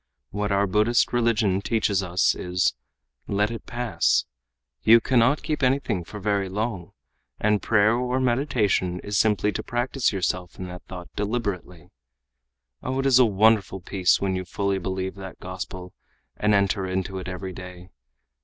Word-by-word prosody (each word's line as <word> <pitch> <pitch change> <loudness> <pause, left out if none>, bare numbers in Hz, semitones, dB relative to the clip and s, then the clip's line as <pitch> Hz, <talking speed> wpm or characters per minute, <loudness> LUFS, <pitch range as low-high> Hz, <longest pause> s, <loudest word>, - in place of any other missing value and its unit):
What 105 +1 -2
our 100 +1 +3
Buddhist 105 +6 +2
religion 115 -5 +2
teaches 105 -3 +1
us 90 0 +2
is: 90 0 0 0.5
'Let 105 +2 0
it 115 - -8
pass!' 115 -8 +1 0.6
You 115 - +7
cannot 130 +4 +2
keep 155 -1 -2
anything 130 -8 +1
for 105 +5 -9
very 100 -1 0
long. 100 -3 -4 0.5
And 105 -1 +2
prayer 110 0 +3
or 125 +1 -1
meditation 120 -8 +1
is 100 0 -1
simply 105 -1 +2
to - - -3
practice 125 +1 -1
yourself 90 -2 -2
in 90 - -6
that 90 0 -8
thought 90 -2 -9
deliberately. 100 -5 -4 0.9
Oh, 130 +1 -3
it 135 - -1
is 130 -2 +5
a 125 - +7
wonderful 105 -2 +3
peace 90 0 +1
when 95 -1 -1
you 95 - -2
fully 100 +2 -1
believe 95 +1 -3
that 95 -1 -9
gospel, 90 0 -7 0.4
and 105 0 +2
enter 100 -1 +1
into 95 +1 -3
it 95 - -7
every 95 0 -5
day. 90 0 -10
100 Hz, 155 wpm, -24 LUFS, 95-115 Hz, 0.9 s, You